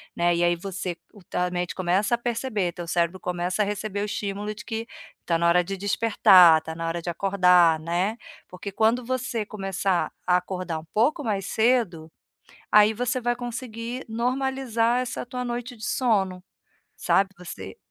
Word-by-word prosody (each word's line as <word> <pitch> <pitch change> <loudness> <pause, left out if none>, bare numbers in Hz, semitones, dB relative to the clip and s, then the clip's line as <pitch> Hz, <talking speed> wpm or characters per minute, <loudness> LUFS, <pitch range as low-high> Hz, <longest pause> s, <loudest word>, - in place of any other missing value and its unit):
né. 175 0 +2
E 170 - +1
aí 175 0 +3
você 185 0 -5 0.2
o 205 - -16
tua 180 +1 -2
mente 175 -1 -3
começa 190 +5 +1
a - - -7
perceber, 230 -5 -2
teu 175 0 -7
cérebro 170 +2 0
começa 180 +2 -2
a - - +3
receber 205 0 -3
o - - 0
estímulo 205 0 -4
de - - -11
que 225 +1 -4 0.4
tá 170 - +2
na 170 +1 +2
hora 175 +1 +4
de 195 +2 -5
despertar, 195 -4 +6
tá 160 0 -7
na 165 +1 -4
hora 170 +1 -2
de 175 - -3
acordar, 180 -3 +4
né. 175 +7 -1 0.3
Porque 185 +2 -8
quando 225 +4 +1
você 250 -3 -2
começar 195 -3 -1
a 180 0 +4
acordar 180 -2 -4
um 160 - -13
pouco 290 +8 +2
mais 205 -5 -1
cedo, 220 -9 +1 0.6
aí 210 +1 +6
você 245 +3 -1
vai 240 0 0
conseguir 240 0 -6
normalizar 245 0 0
essa 255 0 -4
tua 250 0 -5
noite 245 +1 -4
de 220 - -13
sono, 195 -8 0 0.6
sabe. 195 0 +2
Você 180 - -9
200 Hz, 175 wpm, -25 LUFS, 180-235 Hz, 0.6 s, despertar